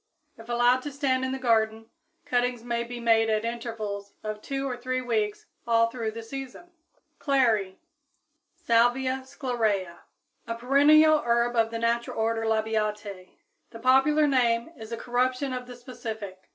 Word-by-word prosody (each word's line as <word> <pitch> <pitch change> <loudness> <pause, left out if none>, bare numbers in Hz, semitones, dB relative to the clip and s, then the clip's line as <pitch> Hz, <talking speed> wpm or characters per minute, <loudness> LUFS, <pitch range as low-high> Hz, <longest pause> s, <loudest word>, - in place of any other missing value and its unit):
If 225 +1 -14
allowed 240 +1 +3
to 290 - -6
stand 270 -2 0
in 260 - -1
the 265 - -2
garden, 225 -3 0 0.3
cuttings 245 -1 0
may 235 -1 -2
be 240 +1 -7
made 225 -1 +3
at 215 0 0
intervals 225 -4 -5
of 215 0 -5
two 275 +2 -3
or 250 - -3
three 255 +1 -2
weeks 220 -4 -2 0.2
all 230 0 +3
through 230 -3 -3
the 225 +1 -7
season. 270 +8 -8 0.5
=Clary= 225 -9 +1 0.8
(Salvia 245 +3 +2
sclarea, 240 -8 -1
Linn.), 170 -1 -14 0.5
a 230 - -3
perennial 295 +5 +5
herb 235 0 +1
of 225 -1 +3
the 230 - -4
natural 235 +1 -1
order 225 0 0
Labiatæ. 215 -3 -2 0.4
The 230 - -10
popular 270 +5 +4
name 245 -1 +1
is 220 -3 -10
a 230 - -3
corruption 255 +3 -1
of 250 -1 -5
the 250 - -9
specific. 220 -6 -8
235 Hz, 155 wpm, -26 LUFS, 225-255 Hz, 0.8 s, perennial